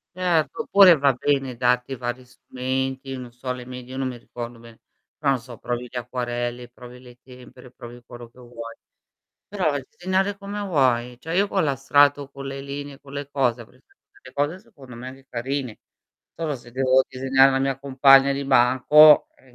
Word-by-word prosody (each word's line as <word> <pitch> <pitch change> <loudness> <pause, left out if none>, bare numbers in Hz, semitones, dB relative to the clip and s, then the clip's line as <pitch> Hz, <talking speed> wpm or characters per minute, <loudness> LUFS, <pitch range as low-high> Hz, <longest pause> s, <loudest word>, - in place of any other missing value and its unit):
Certo, 180 +3 0
oppure 190 -6 +7
va 140 -1 +3
bene 135 0 -1
darti 125 +2 0
vari 120 +1 -5
strumenti, 130 +1 -4
non 125 -2 -9
so 125 +2 -9
alle 125 -1 -4
medie, 125 0 -10
io 130 - -7
non 135 -1 -1
mi 125 -1 -6
ricordo 120 0 -9
bene, 115 -1 -16 0.4
però 140 -2 0
non 130 - -2
so 120 -2 -12
provi 120 0 -4
gli - - -15
acquarelli, 120 0 -4
provi 125 0 -13
le 125 -1 -16
tempere, 125 0 -15
provi 120 -1 -12
quello 120 0 -11
che 125 - -21
vuoi. 115 -2 -10 0.7
Però 180 -7 -1
disegnare 190 +8 -2
come 200 +1 -6
vuoi: 125 -9 0
cioè 165 +5 -5
io 200 +2 +3
con 195 -2 0
la 140 -3 0
strato, 145 +1 +3
con 140 0 -9
le 135 0 -6
linee, 140 0 -7
con 140 0 -15
le 140 0 -6
cose, 125 -4 0
avrei 125 +3 -17
fatto - - -33 0.2
delle 130 - -14
cose 145 +6 -1
secondo 140 - -15
me 125 +2 -9
anche 135 0 -15
carine. 130 -1 -4 0.6
Solo 160 -3 -3
se 120 -1 -14
devo 130 +1 +3
disegnare 135 +1 +3
la 135 - 0
mia 135 0 -1
compagna 135 0 +5
di 140 0 -3
banco, 135 +4 +6
ehm, 130 - -25
130 Hz, 190 wpm, -23 LUFS, 125-140 Hz, 0.7 s, oppure